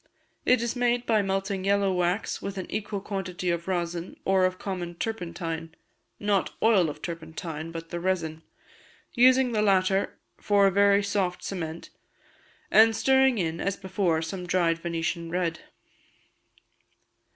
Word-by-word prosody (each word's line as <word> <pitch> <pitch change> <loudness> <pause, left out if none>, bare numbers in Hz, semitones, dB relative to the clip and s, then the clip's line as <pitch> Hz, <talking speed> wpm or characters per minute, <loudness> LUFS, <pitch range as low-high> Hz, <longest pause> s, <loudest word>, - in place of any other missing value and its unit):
It 250 -1 +4
is 235 +1 -2
made 245 0 +1
by 220 -3 +3
melting 195 0 -2
yellow 200 -1 +2
wax 180 +3 -1
with 200 0 -5
an 185 - -3
equal 205 -1 -3
quantity 190 -3 -3
of 170 0 -3
rosin, 175 -1 -3
or 190 -1 +4
of 185 0 -1
common 180 -3 -5
turpentine 170 -5 -4 0.4
(not 205 -2 0
oil 200 -7 +4
of 150 +1 -9
turpentine, 165 -1 -6
but 165 0 -7
the 175 - -3
resin), 170 -3 -2 0.7
using 255 0 +5
the 215 -2 +1
latter 195 -1 +2 0.2
for 205 -1 +3
a 195 - +4
very 200 +1 +4
soft 195 -3 -1
cement, 165 -4 -5 0.8
and 225 +1 +6
stirring 265 +2 +4
in, 165 -3 -1
as 195 0 -1
before, 185 -4 0
some 180 +2 -5
dried 170 -2 +2
Venetian 170 0 -3
red. 170 -2 -1
185 Hz, 140 wpm, -27 LUFS, 170-205 Hz, 0.8 s, and